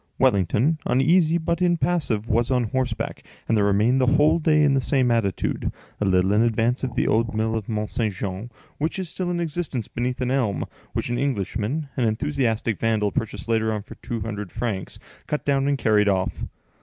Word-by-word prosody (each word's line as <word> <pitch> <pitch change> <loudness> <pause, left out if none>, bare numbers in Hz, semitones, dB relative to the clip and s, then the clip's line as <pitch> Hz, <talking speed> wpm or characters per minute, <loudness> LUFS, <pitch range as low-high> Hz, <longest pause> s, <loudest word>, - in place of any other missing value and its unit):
Wellington, 130 - +2
uneasy 160 +5 +3
but 170 +1 -1
impassive, 170 -10 +1
was 115 +1 +1
on 125 -2 +2
horseback, 125 +1 -2 0.3
and 115 - +2
there 105 - +3
remained 105 +6 +3
the 130 - +3
whole 150 +4 +4
day 155 -1 +3
in 145 -2 +4
the 135 - +2
same 130 -2 +2
attitude, 110 -5 0 0.3
a 105 - 0
little 95 0 +3
in 105 - +4
advance 115 +2 +1
of 125 -3 -3
the - - +1
old 115 +1 +1
mill 110 +1 0
of 110 -1 -4
Mont 105 -1 -2
Saint 110 -3 0
Jean, 95 +4 -4 0.3
which 155 +5 -1
is 185 -3 -3
still 180 +1 -3
in 175 -1 -1
existence, 160 -8 -3
beneath 125 +1 -3
an 125 -1 -1
elm, 120 -8 0 0.3
which - - -2
an 120 - -1
Englishman, 135 - -1
an 125 - +1
enthusiastic 115 -2 -1
vandal, 110 -2 +1
purchased 115 +3 -3
later 110 -1 +1
on 105 -2 -3
for - - -11
two 115 -2 -5
hundred 105 -3 -5
francs, 110 -5 -4 0.3
cut 150 - -2
down, 140 -1 +2
and 140 -1 +2
carried 105 -4 +3
off. 95 -1 -1
120 Hz, 195 wpm, -24 LUFS, 110-140 Hz, 0.3 s, whole